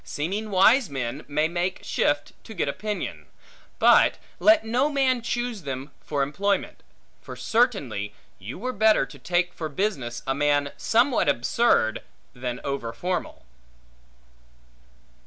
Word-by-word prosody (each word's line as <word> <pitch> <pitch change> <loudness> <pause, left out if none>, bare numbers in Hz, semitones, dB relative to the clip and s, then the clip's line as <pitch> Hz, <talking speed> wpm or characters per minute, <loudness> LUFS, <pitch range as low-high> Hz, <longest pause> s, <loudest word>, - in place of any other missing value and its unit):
Seeming 195 +9 -3
wise 210 - +5
men 135 0 -4
may 150 +2 +1
make 175 +2 -2
shift 145 0 0
to 220 - -10
get 175 - -1
opinion; 210 +9 -4 0.5
but - - +5 0.2
let 320 -6 +5
no 250 +6 +1
man 265 -4 +1
choose 240 -2 -3
them 135 -1 -6
for 145 -2 -1
employment; 200 +9 -1 0.4
for - - -9
certainly 145 - 0 0.3
you 100 +6 -7
were 255 +6 -3
better 215 - +4
take 175 +6 -1
for 160 -2 -5
business, 140 - -2
a 135 - 0
man 145 0 +1
somewhat 240 +3 +2
absurd, 120 - +2 0.3
than 125 0 -4
over 140 -5 -3
formal. 180 - -4
175 Hz, 125 wpm, -25 LUFS, 140-220 Hz, 0.5 s, wise